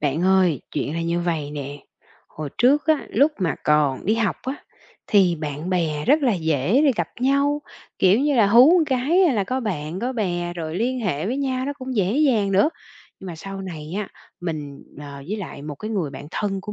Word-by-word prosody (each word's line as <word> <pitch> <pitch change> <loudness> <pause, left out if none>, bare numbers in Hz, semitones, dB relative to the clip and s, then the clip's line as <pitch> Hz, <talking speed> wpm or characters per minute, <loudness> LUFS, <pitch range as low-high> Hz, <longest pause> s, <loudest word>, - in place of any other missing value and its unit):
Bạn 150 +3 0
ơi, 185 -6 +3
chuyện 145 - -2
là 165 - -2
như 170 +1 -1
vầy 160 -4 -2
nè, 145 -1 -6 0.5
hồi 155 -1 -6
trước 280 +6 +4
á, 315 -2 +2
lúc 290 +3 +3
mà 175 -5 0
còn 150 -2 +2
đi 215 - +3
học 225 -5 0
á 265 +2 -4 0.5
thì 190 -4 +4
bạn 150 +2 -5
bè 160 -5 0
rất 290 +4 +4
là 245 -5 +3
dễ 160 - +1
để 275 - +5
gặp - - -1
nhau, 280 +3 +2 0.4
kiểu 195 +5 +4
như 290 0 +2
là, 220 -4 +5
hú 240 +8 +7
một 330 - +3
cái 260 -3 +1
hay 325 +9 +2
là 205 -3 +1
có 255 +6 -2
bạn 175 -6 -4
có 250 +2 -1
bè 175 -7 -2
rồi 165 -1 -4
liên 250 +5 -1
hệ 180 -6 -1
với 245 +5 -1
nhau 260 -2 -1
nó 285 - -2
cũng 255 -1 -5
dễ 195 -1 +1
dàng 230 -10 +2
nữa. 200 +11 +4 0.5
Nhưng 190 - -9
mà 170 - -7
sau 195 +4 -7
này 165 -3 -7
á 210 - -4 0.3
mình, 150 -5 -5 0.2
ờ, 145 -1 -8
với 210 - -2
lại 190 -8 -7
một 150 0 -6
cái 215 +9 -6
người 185 -9 -1
bạn 140 +1 -9
thân 195 -1 -2
của 210 - -7
190 Hz, 220 wpm, -22 LUFS, 155-250 Hz, 0.5 s, hú